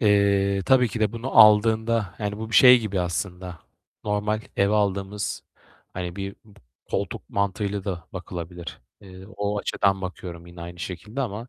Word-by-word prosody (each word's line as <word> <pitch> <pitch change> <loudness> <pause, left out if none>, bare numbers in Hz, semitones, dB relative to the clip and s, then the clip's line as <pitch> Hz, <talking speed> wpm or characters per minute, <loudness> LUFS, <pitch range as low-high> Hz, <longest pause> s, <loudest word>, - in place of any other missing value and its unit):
Eee, 100 -2 +3
tabii 125 -2 +5
ki 115 - -5
de 105 -1 +1
bunu 120 +3 -2
aldığında, 110 -1 +5
yani 105 -1 -3
bu 110 0 -6
bir - - -4
şey 125 -1 +9
gibi 100 -4 -2
aslında 90 0 -4 0.5
normal 105 +1 -1 0.2
eve 100 +2 +3
aldığımız 100 0 -1 0.5
hani 90 -1 -5
bir 100 0 -5
b 105 -2 -20 0.3
koltuk - - -3
mantığıyla 100 0 -1
da 90 -4 -4
bakılabilir. 90 -2 -7 0.2
Eee, 95 -1 -12
o 105 0 -1
açıdan 100 -1 +1
bakıyorum 90 -2 -7
yine 85 0 -12
aynı 85 +1 -8
şekilde 105 +10 -6
ama 115 -1 -4
100 Hz, 155 wpm, -24 LUFS, 95-105 Hz, 0.5 s, şey